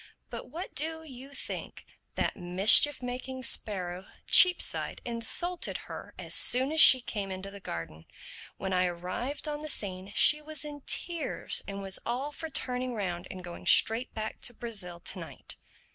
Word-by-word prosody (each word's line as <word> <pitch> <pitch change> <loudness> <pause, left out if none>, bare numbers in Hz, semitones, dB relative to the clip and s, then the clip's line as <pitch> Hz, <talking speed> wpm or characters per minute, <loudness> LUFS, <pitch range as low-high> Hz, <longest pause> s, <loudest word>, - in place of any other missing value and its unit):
But - - -8
what 335 +7 -7
do 320 +2 -2
you 270 -3 -11
think? - - -7 0.3
That - - -1
mischief 195 +10 +5
making 255 +1 -6
sparrow, 185 -6 -2 0.2
Cheapside, 365 -1 +5
insulted 245 +10 +1
her - - -10
as - - -3
soon 260 +3 +3
as 315 0 +5
she 255 - +9
came 205 -5 -5
into 190 +1 -7
the 200 - -11
garden. 80 - -8 0.5
When 190 0 -4
I 180 0 +2
arrived 185 - -5
on 295 -1 -4
the 305 0 -5
scene 190 -5 -1
she 300 0 +5
was 305 -1 -8
in 290 -1 -8
tears 340 -2 -2
and 200 -1 -6
was 195 -1 -2
all 260 +5 -3
for 320 +2 -7
turning 250 -3 -3
round 180 -4 -4
and 185 -1 -9
going 175 -1 -9
straight 225 +3 +5
back 220 0 -5
to 245 - 0
Brazil 200 -8 -5
to - - -2
night. - - -9
235 Hz, 165 wpm, -29 LUFS, 190-290 Hz, 0.5 s, she